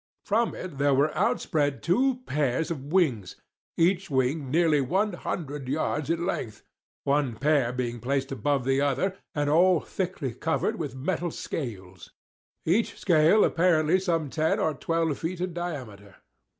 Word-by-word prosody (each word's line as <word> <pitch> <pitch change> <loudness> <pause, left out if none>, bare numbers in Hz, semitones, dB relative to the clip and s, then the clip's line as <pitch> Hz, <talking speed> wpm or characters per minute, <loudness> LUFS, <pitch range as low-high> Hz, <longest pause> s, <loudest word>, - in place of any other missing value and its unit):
From 225 +3 +1
it 170 -7 -7
there 140 -1 +3
were 145 +3 +2
outspread 145 -3 0
two 250 +8 +2
pairs 145 +2 0
of 140 -5 -5
wings—each 170 - -1
wing 135 +1 0
nearly 160 -1 +3
one 190 +10 0
hundred 145 -5 -5
yards 150 0 -1
in 170 +1 0
length—one 140 - -3
pair 140 -1 +2
being 120 -1 -3
placed 135 +2 -1
above 135 -1 0
the 135 +1 +2
other, 145 +8 0 0.2
and 145 -1 0
all 175 +3 +4
thickly 175 -10 -4
covered 160 +7 -1
with 145 -6 -4
metal 170 +5 -2
scales; 95 - -6 0.6
each 195 +8 +1
scale 170 +4 +5
apparently 170 0 +3
some 165 -6 -1
ten 155 0 +1
or 155 - +1
twelve 165 +1 -1
feet 175 +2 -3
in 180 -1 -3
diameter. 125 - -6
150 Hz, 140 wpm, -27 LUFS, 135-175 Hz, 0.6 s, scale